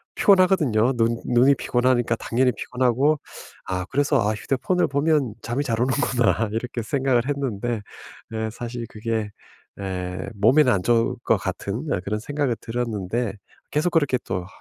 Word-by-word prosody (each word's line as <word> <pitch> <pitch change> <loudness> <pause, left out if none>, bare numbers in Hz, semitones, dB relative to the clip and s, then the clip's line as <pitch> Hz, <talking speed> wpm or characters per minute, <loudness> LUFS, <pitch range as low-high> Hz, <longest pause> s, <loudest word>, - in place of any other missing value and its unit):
피곤하거든요. 170 - +4
눈 115 0 +2
눈이 125 +3 +4
피곤하니까 120 -2 +1
당연히 125 +3 +1
피곤하고 130 +6 +1 0.5
아 90 -1 -2
그래서 145 0 +2
'아 105 0 +1
휴대폰을 140 - 0
보면 140 -4 +1
잠이 120 +5 -1
잘 115 -4 -1
오는구나.' 125 -3 +1
이렇게 120 +1 -3
생각을 130 -2 +1
했는데 120 -5 -2 0.5
네 110 0 -2
사실 120 0 -6
그게 110 -1 -3 0.5
예 90 -1 -4
몸에는 125 +7 +5
안 95 -2 0
좋을 120 +1 +2
것 115 - +3
같은 100 - -4
어 - - 0
그런 105 +2 -1
생각은 145 -1 -1
들었는데 115 -2 -2 0.4
계속 150 +4 +1
그렇게 145 -6 +2
또 90 -1 -2
아 - - -13
120 Hz, 330 characters per minute, -23 LUFS, 110-135 Hz, 0.5 s, 몸에는